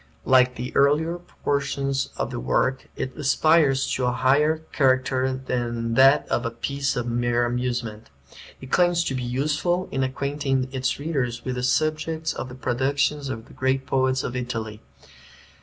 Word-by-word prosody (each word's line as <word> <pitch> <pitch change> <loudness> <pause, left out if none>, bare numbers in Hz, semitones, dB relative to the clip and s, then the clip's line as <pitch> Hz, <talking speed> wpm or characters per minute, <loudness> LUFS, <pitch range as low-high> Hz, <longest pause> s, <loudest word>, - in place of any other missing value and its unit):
Like 130 -1 +4
the 125 +2 -6
earlier 160 +5 +3 0.2
portions 140 -1 0
of - - -2
the - - -4
work, 130 - 0
it 130 - -4
aspires 145 -1 +3
to 125 - 0
a - - +2
higher 145 +6 +2
character 130 -1 +1
than 120 -2 -2
that 135 +3 +5
of 120 - 0
a 115 - -1
piece 140 +4 -2
of 120 -2 -2
mere 120 0 +1
amusement. 120 -3 -3 0.5
It 130 - -11
claims 175 -1 +3
to 135 - -2
be 130 - -2
useful, 150 +8 -1
in 135 - -1
acquainting 135 0 -1
its 130 -1 -1
readers 135 -6 -2
with 130 - -2
the 125 - -3
subjects 155 +4 0
of 130 - -6
the 125 - -9
productions 140 +3 0
of 115 -3 -5
the - - -16
great 130 0 0
poets 130 0 +1
of 125 - -4
Italy. 115 -3 -4
130 Hz, 160 wpm, -24 LUFS, 125-140 Hz, 0.5 s, that